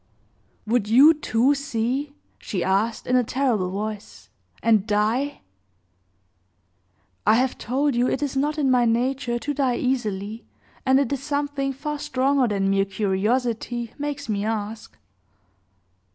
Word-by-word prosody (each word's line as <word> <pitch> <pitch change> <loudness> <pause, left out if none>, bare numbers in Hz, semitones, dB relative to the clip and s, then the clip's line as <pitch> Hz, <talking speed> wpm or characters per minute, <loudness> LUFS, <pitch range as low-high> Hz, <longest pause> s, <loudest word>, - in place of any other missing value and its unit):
"Would 225 -1 +1
you, 275 +8 +8
too, 265 -3 +2
see?" 280 +1 -2 0.2
she 185 -4 -3
asked, 200 +4 0
in 250 - +1
a 250 - +4
terrible 235 -7 0
voice, 210 +2 -6 0.3
"and 220 -3 +3
die?" 225 +7 0 1.9
"I - - +6
have 255 +2 0
told 275 +5 0
you 245 +1 +2
it 270 - -1
is 275 -2 -3
not 295 +3 0
in 275 -3 +2
my 250 -1 +4
nature 240 +1 0
to 290 +5 -3
die 265 -3 +1
easily, 220 -4 -2 0.4
and 265 +1 +5
it 280 -1 0
is 275 - -3
something 285 -1 -2
far 295 +2 -5
stronger 265 -1 +1
than 195 -2 0
mere 195 0 +2
curiosity 225 +4 -1
makes 290 -1 -4
me 205 -2 -1
ask." 220 0 -4
245 Hz, 135 wpm, -24 LUFS, 215-275 Hz, 1.9 s, you